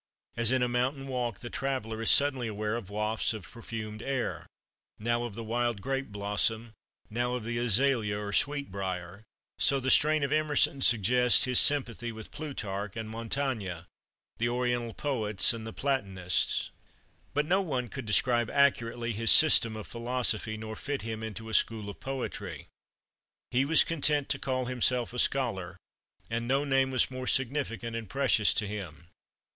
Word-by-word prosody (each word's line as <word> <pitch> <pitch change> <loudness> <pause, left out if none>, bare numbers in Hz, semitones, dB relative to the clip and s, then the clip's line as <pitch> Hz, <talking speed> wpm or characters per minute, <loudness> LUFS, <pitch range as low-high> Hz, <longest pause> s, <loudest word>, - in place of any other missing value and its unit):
As 115 0 +2
in 130 -1 +2
a - - +2
mountain 130 +3 -1
walk 125 -5 -3
the 120 - -7
traveller 130 -5 -3
is 115 - +1
suddenly 135 -4 +3
aware 105 0 -2
of 110 -5 -6
wafts 105 +2 -1
of 100 -6 -9
perfumed 110 -2 -6
air, 135 -1 -3 0.5
now 120 +2 0
of 115 -4 -6
the 115 - -5
wild 120 0 -1
grape 135 +5 -2
blossom, 105 +3 -1 0.4
now 120 +2 0
of 125 - -4
the 120 0 -2
azalea 120 -2 +2
or 100 -1 -5
sweet 145 +3 0
brier, 95 0 -4 0.4
so 140 - +3
the 130 0 0
strain 155 0 +4
of 140 - -1
Emerson 150 -2 +2
suggests 120 +2 +5
his 125 -2 +3
sympathy 120 -5 +1
with 110 -1 -9
Plutarch 105 -9 -5
and 110 -1 -5
Montaigne, 115 -6 -2 0.6
the 120 +1 +1
Oriental 120 -1 -1
poets 110 -10 +1
and 110 -1 -6
the - - -5
Platonists. 100 - -1 0.6
But 145 +1 +2
no 185 +5 +3
one 130 -9 -2
could 110 - -7
describe 120 +2 +3
accurately 120 -4 +2
his 115 +2 +1
"system" 115 -8 +6
of 110 - -7
philosophy, 115 -2 -2
nor 110 0 -6
fit 140 0 -4
him 110 -1 -4
into 110 0 -6
a 110 - -7
"school" 110 -3 +1
of - - -15
poetry. 105 - -5 0.9
He 125 +2 +2
was 160 +2 +5
content 150 -3 +2
to - - 0
call 130 -1 -1
himself 125 -1 0
a 125 - -2
scholar, 95 -11 0 0.5
and 115 +1 -3
no 135 +3 +2
name 135 -1 +2
was 130 0 +1
more 130 0 -5
significant 125 -3 -1
and 115 -4 -5
precious 135 -6 +3
to 105 - +1
him. 95 -6 -7
120 Hz, 165 wpm, -29 LUFS, 110-135 Hz, 0.9 s, system